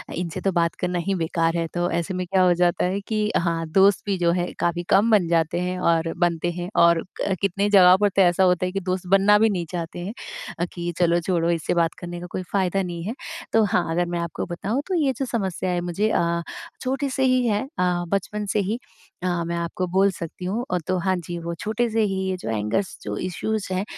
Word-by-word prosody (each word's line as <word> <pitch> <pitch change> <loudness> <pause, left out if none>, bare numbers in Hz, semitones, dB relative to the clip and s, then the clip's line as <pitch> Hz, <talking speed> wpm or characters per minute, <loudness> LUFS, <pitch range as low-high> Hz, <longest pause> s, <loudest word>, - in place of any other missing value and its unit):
इनसे 170 -1 -4
तो 195 - +1
बात 170 -2 +1
करना 180 -1 -1
ही 195 - +1
बेकार 165 0 0
है। 165 -1 -1
तो 175 0 0
ऐसे 170 +3 -4
में 185 0 -2
क्या 190 0 +2
हो 180 -1 +5
जाता 175 0 +2
है 190 +2 -1
कि 215 -1 -1 0.2
हाँ, 165 -1 0
दोस्त 195 +1 +5
भी 200 -2 0
जो 170 -1 +2
है 175 0 -1
काफ़ी 175 0 0
कम 215 +4 +4
बन 195 -6 +4
जाते 165 0 +1
हैं 180 0 -2
और 165 0 0
बनते 175 0 +1
हैं 175 +1 -5
और 170 -1 +5 0.4
कितने 200 +1 +1
जगह 185 -3 +8
पर 205 - +4
तो 195 - +2
ऐसा 180 +1 +4
होता 180 0 +3
है 180 - -2
कि 195 - -2
दोस्त 185 0 -2
बनना 195 +2 +5
भी 220 0 +4
नहीं 180 -4 -2
चाहते 170 0 -5
हैं। 190 +5 -5 0.5
अ, 175 - +1
कि 175 0 -3
चलो 170 -1 +3
छोड़ो 170 -1 0
इससे 165 -2 -1
बात 170 -1 +1
करने 175 -1 -6
का 175 - -7
कोई 185 - -3
फ़ायदा 195 -1 +1
नहीं 175 -2 -5
है। 210 +6 -3 0.4
तो 225 - +5
हाँ, 180 -4 +1
अगर 175 +2 +1
मैं 175 0 -3
आपको 170 -1 -3
बताऊँ 200 +9 -2
तो 380 - -2
ये 290 -6 +2
जो 270 - -1
समस्या 190 -7 -2
है 175 -1 0
मुझे 180 +5 0
अ, 170 -4 +1 0.4
छोटे 270 +2 -1
से 265 - -1
ही 255 -1 +3
है, 210 -2 +1 0.2
अ, 180 -1 +1
बचपन 200 +3 -2
से 210 - +2
ही। 205 +4 -1 0.5
अ, 175 -2 0
मैं 170 +1 -2
आपको 170 +2 -2
बोल 190 +2 +3
सकती 170 +1 -7
हूँ। 220 +7 -2
और 180 -2 0
तो 185 - +1
हाँ 185 +1 +1
जी 175 +1 -5
वो 170 0 -4
छोटे 220 +2 -1
से 225 +1 +1
ही 195 -2 0
ये 185 - -1
जो 175 - -6
एंगर्स 110 - -1
जो - - -4
इशूज़ 200 +3 -2
हैं 185 +2 0
180 Hz, 240 wpm, -23 LUFS, 170-200 Hz, 0.5 s, जगह